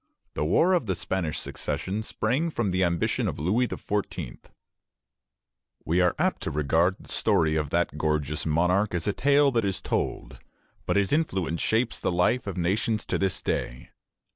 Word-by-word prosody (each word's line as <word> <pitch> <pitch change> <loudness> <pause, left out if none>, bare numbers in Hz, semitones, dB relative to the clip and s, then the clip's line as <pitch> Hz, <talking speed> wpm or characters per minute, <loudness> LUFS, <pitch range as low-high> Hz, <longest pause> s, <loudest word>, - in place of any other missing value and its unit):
The - - -2
War 165 - +3
of 170 -11 +1
the 95 - 0
Spanish 85 -2 -2
Succession 100 +4 -3
sprang 125 +9 -1
from 120 - -1
the 90 +1 +1
ambition 85 -1 0
of - - -3
Louis 105 - +1
XIV. 95 - -4 1.5
We 85 +3 +2
are 90 -1 +2
apt - - 0
to - - -2
regard 80 +5 +2
the - - -15
story 80 -1 +2
of 75 -2 -1
that 85 -3 0
gorgeous 75 -1 0
monarch 90 +5 +1
as 85 - -2
a 105 - +1
tale 140 +2 +4
that 115 -3 +1
is 100 -2 -1
told; - - -3 0.5
but - - +1
his 100 +5 +1
influence 95 - 0
shapes 115 +2 +1
the - - -1
life 90 +7 +1
of 95 - -4
nations 105 +5 0
to - - -1
this 95 -1 -1
day. 60 - -3
95 Hz, 170 wpm, -26 LUFS, 80-110 Hz, 1.5 s, tale